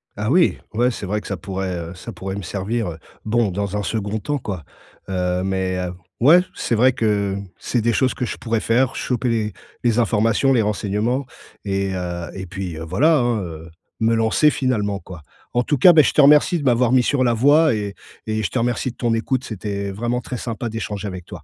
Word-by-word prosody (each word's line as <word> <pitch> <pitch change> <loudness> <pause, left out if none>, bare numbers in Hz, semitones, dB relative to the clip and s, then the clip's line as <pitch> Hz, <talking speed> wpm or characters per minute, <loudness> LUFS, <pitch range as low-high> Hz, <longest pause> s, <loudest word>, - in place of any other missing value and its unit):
Ah 105 +1 -2
oui, 175 +5 +3 0.2
ouais, 120 +3 +3
c'est 105 -4 -6
vrai 105 +2 -1
que - - -11
ça 100 - -3
pourrait, 95 +1 -4
heu, 85 0 -6
ça 90 - -8
pourrait 95 0 -5
me 100 - -5
servir, 105 +4 -2
heu, 80 - -9 0.3
bon, 115 0 +2
dans 100 +2 -2
un - - -1
second 105 +1 -2
temps, 145 +7 -2
quoi. 95 - -5 0.5
Heu, 90 -1 0
mais 95 -1 -1 0.4
ouais, 155 +9 +7
c'est 115 - -1
vrai 125 +4 +5
que 100 -4 0 0.2
c'est 120 - -1
des 115 +1 +1
choses 130 +2 +2
que - - -4
je 120 - -3
pourrais 115 -1 -1
faire, 120 +3 +1
choper 125 0 -1
les 110 -3 -1 0.3
les 120 -2 +2
informations, 115 +3 +2
les 120 - +4
renseignements 105 +5 -1 0.4
et 100 -1 -1
heu, 85 -1 -4
et 95 - -5
puis, 95 -2 -6
heu, 80 - -6
voilà 150 - +3
hein, 120 -4 +1
heu, 80 -2 -8 0.3
me 115 +1 +3
lancer 115 +7 +3
finalement, 105 -8 -1
quoi. 90 -4 -11 0.3
En 120 0 +2
tout 145 +2 0
cas, 175 +7 +8
bah, 155 -2 +7
je 120 - +2
te - - +5
remercie 150 +5 +5
de - - -5
m'avoir 125 -2 +3
mis 130 -1 +5
sur 135 0 +1
la 120 -2 +3
voie 145 +6 +4
et 100 -2 -3 0.3
et 110 0 -1
je - - -1
te 130 - 0
remercie 120 +2 -1
de - - -20
ton 120 -2 0
écoute, 130 +3 -1
c'était, 100 -2 -4
vraiment 120 +5 -2
très 125 +1 -5
sympa 115 0 -4
d'échanger 105 -2 -4
avec 90 -3 -7
toi. - - -10
110 Hz, 220 wpm, -21 LUFS, 95-125 Hz, 0.5 s, cas